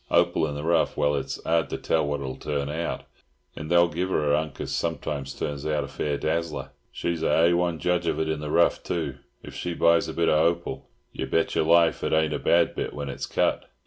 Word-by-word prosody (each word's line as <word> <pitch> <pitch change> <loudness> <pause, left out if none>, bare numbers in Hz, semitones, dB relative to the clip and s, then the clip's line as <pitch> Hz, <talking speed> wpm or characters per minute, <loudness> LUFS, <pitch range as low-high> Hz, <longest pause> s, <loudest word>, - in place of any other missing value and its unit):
Hopal 85 -2 +3
in 75 - -5
the 75 - -5
rough, 85 +1 +1
well, 75 0 +2
it's 70 -2 -2
'ard 80 0 +1
to - - -3
tell 80 -2 0
what 75 -1 -2
it'll 65 -1 -4
turn 70 -1 -3
out, 80 +3 -3 0.5
and 80 0 -7
they'll 85 0 +5
give 90 +3 -3
'er 75 -4 +1
a - - +6
'unk 75 -3 -8
as - - -4
sometimes 75 -4 -3
turns 70 -1 -4
out 75 -1 0
a - - -6
fair 75 -1 -2
dazzler. 80 -4 -2 0.2
She's 85 -2 -3
a - - +1
hay 85 +2 +4
one 85 -1 +1
judge 90 +3 0
of - - 0
it 80 - 0
in 80 -1 -1
the 75 0 -5
rough, - - +3
too. 75 -6 -3 0.2
If - - -10
she 90 -1 -4
buys 85 0 +4
a - - -5
bit 85 - +1
of 75 - +4
hopal, 85 +1 -1 0.2
yer 65 - -4
bet 80 +5 +1
yer - - +2
life 85 +1 +4
it - - 0
ain't 80 -1 +2
a - - -2
bad 85 0 +3
bit - - -4
when 70 -1 -4
it's 70 - -5
cut. - - 0
80 Hz, 240 wpm, -26 LUFS, 75-85 Hz, 0.5 s, a